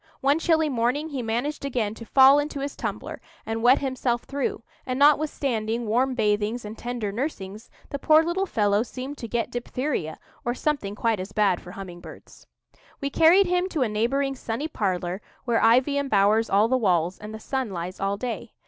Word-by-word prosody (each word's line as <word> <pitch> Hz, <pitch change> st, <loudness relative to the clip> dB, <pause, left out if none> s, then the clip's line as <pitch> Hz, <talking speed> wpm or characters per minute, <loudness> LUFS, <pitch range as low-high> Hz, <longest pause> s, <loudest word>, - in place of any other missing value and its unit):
One 280 Hz, +3 st, +3 dB
chilly 320 Hz, -1 st, +2 dB
morning 260 Hz, +4 st, 0 dB
he 275 Hz, -4 st, -3 dB
managed 245 Hz, +7 st, -2 dB
again 240 Hz, -6 st, -1 dB
to 230 Hz, 0 st, -11 dB
fall 270 Hz, +1 st, +7 dB
into 290 Hz, -1 st, -3 dB
his 280 Hz, +1 st, -4 dB
tumbler, -, -, -5 dB, 0.2 s
and 225 Hz, 0 st, -3 dB
wet 245 Hz, +3 st, +6 dB
himself 255 Hz, -3 st, -1 dB
through; 275 Hz, -4 st, -3 dB, 0.2 s
and 255 Hz, -1 st, -3 dB
notwithstanding 265 Hz, -6 st, +2 dB
warm 250 Hz, +4 st, +1 dB
bathings 210 Hz, +1 st, 0 dB
and 210 Hz, +1 st, -7 dB
tender 235 Hz, -3 st, -4 dB
nursings, 215 Hz, -3 st, -5 dB, 0.2 s
the 280 Hz, -, -3 dB
poor 310 Hz, +3 st, +5 dB
little 365 Hz, +4 st, -1 dB
fellow 205 Hz, -, +2 dB
seemed 260 Hz, +4 st, -6 dB
to 230 Hz, -, -5 dB
get 235 Hz, +1 st, -2 dB
diphtheria, 245 Hz, -, -3 dB, 0.3 s
or 240 Hz, +1 st, -1 dB
something 255 Hz, -9 st, -2 dB
quite 225 Hz, -1 st, 0 dB
as 190 Hz, +2 st, -6 dB
bad 205 Hz, -4 st, +2 dB
for 180 Hz, -, -11 dB
humming 185 Hz, -3 st, -8 dB
birds. -, -, -14 dB, 0.5 s
We 280 Hz, 0 st, -3 dB
carried 345 Hz, +7 st, +6 dB
him 360 Hz, +1 st, 0 dB
to 310 Hz, -7 st, 0 dB
a -, -, 0 dB
neighbouring 270 Hz, +6 st, 0 dB
sunny 250 Hz, +4 st, -4 dB
parlour, 185 Hz, -, -2 dB, 0.2 s
where 235 Hz, -2 st, +1 dB
ivy 255 Hz, +5 st, +4 dB
embowers 220 Hz, -4 st, +2 dB
all 205 Hz, +3 st, +4 dB
the 260 Hz, +2 st, +2 dB
walls 180 Hz, -6 st, +1 dB
and 210 Hz, +1 st, -8 dB
the 220 Hz, -, -7 dB
sun 265 Hz, +1 st, -3 dB
lies 180 Hz, 0 st, -6 dB
all 195 Hz, +1 st, -1 dB
day. 235 Hz, 0 st, -5 dB
240 Hz, 185 wpm, -25 LUFS, 210-280 Hz, 0.5 s, fall